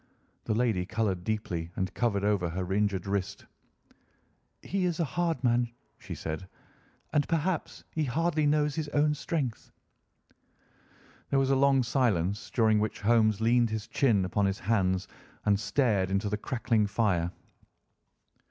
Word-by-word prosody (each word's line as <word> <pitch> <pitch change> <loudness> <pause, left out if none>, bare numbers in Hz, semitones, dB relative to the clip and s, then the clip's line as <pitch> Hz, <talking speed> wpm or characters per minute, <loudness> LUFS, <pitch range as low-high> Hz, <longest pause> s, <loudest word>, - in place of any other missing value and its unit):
The 110 - 0
lady 110 -6 +1
coloured 100 -6 -1
deeply 90 -6 -3
and 95 0 -2
covered 105 -5 0
over 100 -4 +1
her 90 +2 -3
injured 100 -2 0
wrist. 100 -1 -3 1.2
"He 190 -1 -1
is 175 -2 -1
a - - +3
hard 165 -3 -1
man," 120 -1 +2 0.3
she - - -7
said, 80 +4 -5 0.7
"and 145 -1 +2
perhaps 165 +1 -1
he 155 -1 -1
hardly 155 +3 +1
knows 150 0 +2
his 155 -1 -3
own 150 +1 +3
strength." 145 -5 -3 1.6
There 140 - +2
was 135 0 +2
a - - +4
long 135 -1 +4
silence, 105 - 0
during 110 -3 +3
which 110 0 -2
Holmes 110 -1 +3
leaned 120 +1 +3
his 110 -1 -3
chin 110 -9 +2
upon 100 +2 +1
his 95 +1 -1
hands 95 -3 +1 0.4
and 100 -1 +3
stared 105 -3 +1
into 100 +2 0
the 105 - 0
crackling 115 -2 0
fire. 100 -5 +1
110 Hz, 145 wpm, -29 LUFS, 100-135 Hz, 1.6 s, a